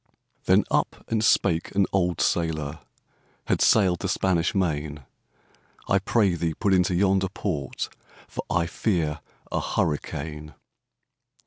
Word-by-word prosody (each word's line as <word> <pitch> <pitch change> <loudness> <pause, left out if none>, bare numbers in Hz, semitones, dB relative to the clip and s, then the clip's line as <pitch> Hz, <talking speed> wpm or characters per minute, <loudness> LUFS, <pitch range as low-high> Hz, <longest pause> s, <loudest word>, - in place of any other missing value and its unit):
Then - - +5
up - - 0
and 110 -1 +1
spake 85 -4 +2
an 100 -1 +4
old 90 -3 +1
sailòr, 80 -3 -1 0.7
Had - - 0
sail'd 95 -6 +4
the 95 - -3
Spanish 90 -2 +1
Main, 75 -6 -1 0.8
'I 95 - +3
pray 100 -1 +2
thee, 85 -2 -2
put 100 -3 +1
into 90 0 +3
yonder 95 0 +2
port, 80 -8 -3 0.4
For - - -5
I 85 -2 +1
fear 85 -5 -1 0.3
a - - 0
hurricane. 75 0 -3
90 Hz, 125 wpm, -25 LUFS, 80-95 Hz, 0.8 s, Then